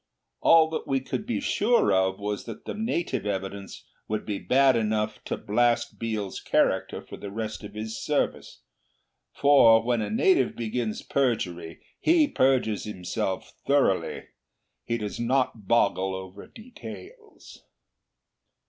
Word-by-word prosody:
All 165 Hz, -1 st, +6 dB
that 160 Hz, -, -4 dB
we 135 Hz, -1 st, +1 dB
could 205 Hz, +10 st, -5 dB
be 240 Hz, -, -1 dB
sure 235 Hz, -, +2 dB
of 95 Hz, 0 st, +2 dB
was 105 Hz, 0 st, -4 dB
that 115 Hz, -2 st, -9 dB
the -, -, -4 dB
native 170 Hz, -, -2 dB
evidence 95 Hz, 0 st, -5 dB, 0.2 s
would 110 Hz, 0 st, -3 dB
be 105 Hz, -2 st, -3 dB
bad 135 Hz, 0 st, +4 dB
enough 110 Hz, -1 st, -1 dB
to -, -, -3 dB
blast 120 Hz, +3 st, 0 dB
Biel's 110 Hz, -4 st, -3 dB
character -, -, 0 dB
for -, -, -10 dB
the 100 Hz, -, -7 dB
rest 110 Hz, +1 st, -5 dB
of 105 Hz, 0 st, -10 dB
his 110 Hz, +1 st, -5 dB
service; -, -, -2 dB, 0.7 s
for 120 Hz, -6 st, +5 dB
when 120 Hz, -1 st, 0 dB
a -, -, -3 dB
native 350 Hz, -, +2 dB
begins 115 Hz, -1 st, -3 dB
perjury 90 Hz, -11 st, -1 dB, 0.2 s
he 320 Hz, -2 st, +4 dB
perjures 130 Hz, -, +1 dB
himself 95 Hz, -2 st, -4 dB
thoroughly. 140 Hz, -9 st, +1 dB, 0.6 s
He 115 Hz, -, -1 dB
does 105 Hz, -2 st, -5 dB
not 120 Hz, -4 st, 0 dB
boggle 95 Hz, -4 st, +2 dB
over 95 Hz, +1 st, -9 dB
details. 115 Hz, -, -12 dB
110 Hz, 135 wpm, -26 LUFS, 100-130 Hz, 0.7 s, All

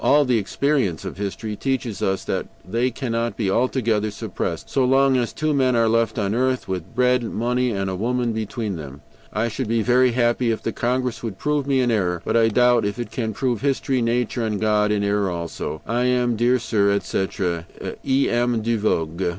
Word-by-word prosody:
But -, -, -1 dB
all 145 Hz, 0 st, +5 dB
the 125 Hz, -3 st, +2 dB
experience 115 Hz, -, 0 dB
of -, -, -6 dB
history 105 Hz, +2 st, -4 dB
teaches 130 Hz, -3 st, -2 dB
us 95 Hz, 0 st, 0 dB
that -, -, -2 dB, 0.2 s
they 115 Hz, +6 st, +1 dB
cannot 120 Hz, -2 st, -2 dB
be 100 Hz, -4 st, 0 dB
altogether 115 Hz, -3 st, +1 dB
suppressed -, -, -4 dB
so 135 Hz, -, +1 dB
long 135 Hz, +1 st, +4 dB
as 120 Hz, -3 st, 0 dB
two 155 Hz, 0 st, -1 dB
men 130 Hz, -3 st, +2 dB
are 115 Hz, -1 st, +3 dB
left 115 Hz, 0 st, +1 dB
on 100 Hz, -2 st, 0 dB
earth, 130 Hz, +2 st, 0 dB
with 95 Hz, +2 st, -5 dB
bread, 125 Hz, 0 st, +3 dB
money, 125 Hz, +2 st, 0 dB
and 100 Hz, -4 st, -2 dB
a 95 Hz, -, -2 dB
woman 120 Hz, +3 st, 0 dB
between 110 Hz, -2 st, -3 dB
them. 70 Hz, -2 st, -9 dB, 0.3 s
"I 110 Hz, +2 st, 0 dB
should 115 Hz, +2 st, -3 dB
be 115 Hz, 0 st, +1 dB
very 125 Hz, +1 st, +4 dB
happy 120 Hz, 0 st, +2 dB
if 110 Hz, -, -1 dB
the 115 Hz, -, -1 dB
Congress 125 Hz, 0 st, -1 dB
would 110 Hz, -5 st, -5 dB
prove 150 Hz, -2 st, -1 dB
me 135 Hz, -2 st, +2 dB
in 120 Hz, -1 st, +2 dB
error. 90 Hz, -5 st, 0 dB
But -, -, 0 dB
I 115 Hz, -1 st, +5 dB
doubt 120 Hz, +1 st, +4 dB
if 100 Hz, +2 st, -2 dB
it 120 Hz, -, -5 dB
can 115 Hz, -3 st, -2 dB
prove 125 Hz, -3 st, -1 dB
history, 135 Hz, -2 st, 0 dB
nature, 120 Hz, +1 st, 0 dB
and 105 Hz, -2 st, -1 dB
God 105 Hz, -1 st, +2 dB
in 105 Hz, -1 st, +1 dB
error 100 Hz, -1 st, +1 dB
also. 85 Hz, -2 st, -5 dB
"I 120 Hz, +2 st, 0 dB
am, 125 Hz, -1 st, +2 dB
dear 120 Hz, +3 st, +3 dB
sir, 110 Hz, -4 st, +1 dB
etc. 95 Hz, -3 st, -1 dB, 0.4 s
"E. 135 Hz, 0 st, +2 dB
M. 120 Hz, -1 st, +1 dB
DE 115 Hz, 0 st, 0 dB
VOGÜÉ." 85 Hz, -3 st, 0 dB
115 Hz, 205 wpm, -22 LUFS, 105-125 Hz, 0.4 s, all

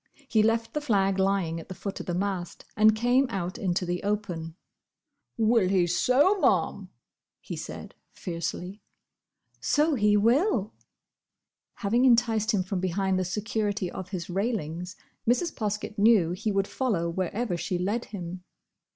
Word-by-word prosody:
He 220 Hz, -4 st, +3 dB
left 225 Hz, +1 st, +1 dB
the 300 Hz, -, -1 dB
flag 195 Hz, -8 st, +1 dB
lying 190 Hz, -4 st, +1 dB
at 165 Hz, -, -12 dB
the 185 Hz, -, -6 dB
foot 200 Hz, +2 st, -5 dB
of -, -, -7 dB
the 175 Hz, -, -1 dB
mast, 185 Hz, -2 st, -3 dB
and 215 Hz, 0 st, +5 dB
came 245 Hz, +4 st, +3 dB
out 185 Hz, -4 st, -4 dB
into 180 Hz, -1 st, 0 dB
the 175 Hz, 0 st, -2 dB
open. 185 Hz, -6 st, -3 dB, 0.8 s
"Will 225 Hz, -4 st, +3 dB
he 185 Hz, -2 st, +3 dB
so, 265 Hz, -, +3 dB
Ma'am!" -, -, +1 dB, 0.5 s
he -, -, -7 dB
said, -, -, -8 dB, 0.2 s
fiercely. 180 Hz, +3 st, -5 dB, 0.8 s
"So 305 Hz, +1 st, +2 dB
he 210 Hz, -5 st, +3 dB
will!" 230 Hz, -, +2 dB, 1.0 s
Having 235 Hz, +5 st, +1 dB
enticed 230 Hz, -3 st, +3 dB
him 200 Hz, -3 st, +1 dB
from 190 Hz, 0 st, -3 dB
behind 185 Hz, +1 st, 0 dB
the -, -, +1 dB
security 205 Hz, 0 st, -2 dB
of 185 Hz, -1 st, -7 dB
his 180 Hz, -4 st, -5 dB
railings, 180 Hz, -3 st, -3 dB, 0.3 s
Mrs. 315 Hz, +7 st, +1 dB
Poskett 210 Hz, -1 st, -3 dB
knew 205 Hz, -6 st, +5 dB
he 210 Hz, +4 st, -2 dB
would 195 Hz, 0 st, +1 dB
follow 210 Hz, -11 st, -1 dB
wherever 185 Hz, +4 st, -2 dB
she 170 Hz, +2 st, -2 dB
led 205 Hz, +7 st, -1 dB
him. 180 Hz, -2 st, -7 dB
200 Hz, 150 wpm, -27 LUFS, 180-225 Hz, 1.0 s, and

